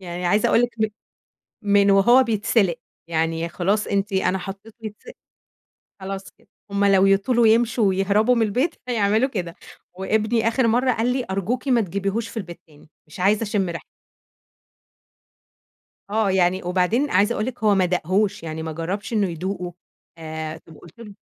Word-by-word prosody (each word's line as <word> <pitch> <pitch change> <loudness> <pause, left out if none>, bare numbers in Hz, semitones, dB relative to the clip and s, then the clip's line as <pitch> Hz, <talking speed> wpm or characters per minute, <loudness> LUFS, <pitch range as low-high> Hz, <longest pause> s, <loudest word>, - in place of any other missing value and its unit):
يعني 175 -1 -5
عايزة 205 +4 +2
أقول 235 - +4
لِك 245 - 0
م 220 - +2 0.9
من 200 0 +5
وهو 240 +7 +6
بيتسلق، 210 -5 +1 0.3
يعني 165 +1 -1
خلاص 195 +5 0
أنتِ 200 +1 -1
أنا 190 0 +1
حطِّيته 195 +4 -9
يتسلق 220 - -9 0.9
خلاص 195 0 -6
كده، - - -30 0.2
همّ 200 0 +1
لو 195 -1 +5
يطولوا 225 +5 +3
يمشوا 225 0 +3
ويهربوا 200 +5 +2
من 230 - +1
البيت 250 +10 0
هيعملوا 220 +1 +1
كده 180 -8 -5 0.4
وابني 220 +4 0
آخر 235 +1 +2
مرّة 250 +3 +2
قال 240 +1 0
لي: 255 -1 -2
"أرجوكِ 230 +8 -2
ما 245 -3 +3
تجيبيهوش 200 +4 -2
في - - -10
البيت 175 -5 -7
تاني، 150 0 -20 0.2
مش 155 - -12
عايزة 205 +4 +2
أشم 205 -4 -1
ريحته." 170 - -6 2.3
آه، 215 -1 +1
يعني 185 0 +2
وبعدين 185 +10 0
عايزة 200 +5 +3
أقول 215 - -2
لِك 245 -3 -6
هو 210 -1 +5
ما 190 -2 +3
داقهوش 185 +3 0
يعني 160 -1 -5
ما 160 0 -5
جربش 180 +8 -4
إنُّه 210 -4 +1
يدوقه 180 +1 -5 0.4
آآ، 160 0 -6
وقلت 165 +6 -16
له 210 -3 -11
200 Hz, 160 wpm, -22 LUFS, 180-225 Hz, 2.3 s, وهو